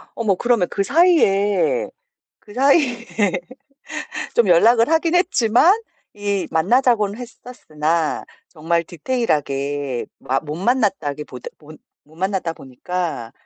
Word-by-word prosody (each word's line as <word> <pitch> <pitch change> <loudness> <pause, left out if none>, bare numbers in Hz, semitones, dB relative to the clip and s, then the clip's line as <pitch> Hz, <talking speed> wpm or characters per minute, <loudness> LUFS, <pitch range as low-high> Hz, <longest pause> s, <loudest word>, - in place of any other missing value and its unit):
어머 215 -5 +1
그러면 235 -4 +1
그 200 - -1
사이에 290 - +2 0.5
그 205 - -16
사이에 260 -3 +2 1.3
좀 230 -5 +3
연락을 230 - +5
하긴 325 +1 +1
했지만 345 - +3 0.4
이 205 -2 -2
만나자고는 210 +4 +2
했었으나 165 -10 -3 0.2
정말 170 +1 -1
디테일하게 145 - -2
마 135 +1 -1
못 150 -1 -6
만났다기보다 175 - -2
보 155 0 -14 0.3
못 155 +2 -21
만났다 190 -2 -2
보니까 140 -2 -5
200 Hz, 245 characters per minute, -20 LUFS, 155-245 Hz, 1.3 s, 연락을